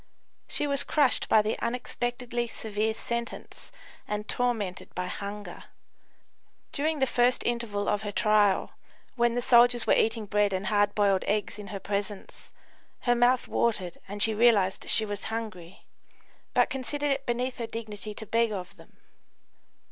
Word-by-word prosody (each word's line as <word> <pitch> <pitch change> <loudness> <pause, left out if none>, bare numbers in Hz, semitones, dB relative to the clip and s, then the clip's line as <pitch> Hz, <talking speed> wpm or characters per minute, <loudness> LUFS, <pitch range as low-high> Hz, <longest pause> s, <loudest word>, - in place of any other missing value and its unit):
She - - -1
was 280 -1 0
crushed 285 -5 +2
by 215 - +5
the 215 - -2
unexpectedly 240 0 -2
severe 220 -1 -2
sentence 235 +1 -5 0.4
and 210 0 -3
tormented 220 -7 -2
by 180 - -2
hunger. 200 +3 -6 1.1
During 310 +2 0
the 265 - +3
first 245 0 +2
interval 235 -4 -1
of 205 - +1
her 205 -1 -4
trial, 210 -1 +3 0.4
when 235 -1 +2
the 245 - 0
soldiers 240 -1 +6
were - - +4
eating 225 -1 +1
bread 205 -1 +1
and 190 +1 -2
hard 205 +1 +2
boiled 200 -2 +3
eggs 210 0 -1
in 205 - -8
her 200 -1 -5
presence, 200 +1 -4 0.5
her 240 - +3
mouth 245 +1 +3
watered 190 -7 -1
and 205 +1 -2
she 220 - +3
realised 210 -4 +3
she 220 - +4
was 205 -1 -5
hungry, 210 -6 -6 0.7
but - - +4
considered 285 +2 -2
it 275 - -2
beneath 245 +2 -1
her 230 - -3
dignity 215 -2 -7
to 220 - -7
beg 230 +1 +1
of 185 -3 -6
them. - - -18
220 Hz, 155 wpm, -28 LUFS, 205-240 Hz, 1.1 s, soldiers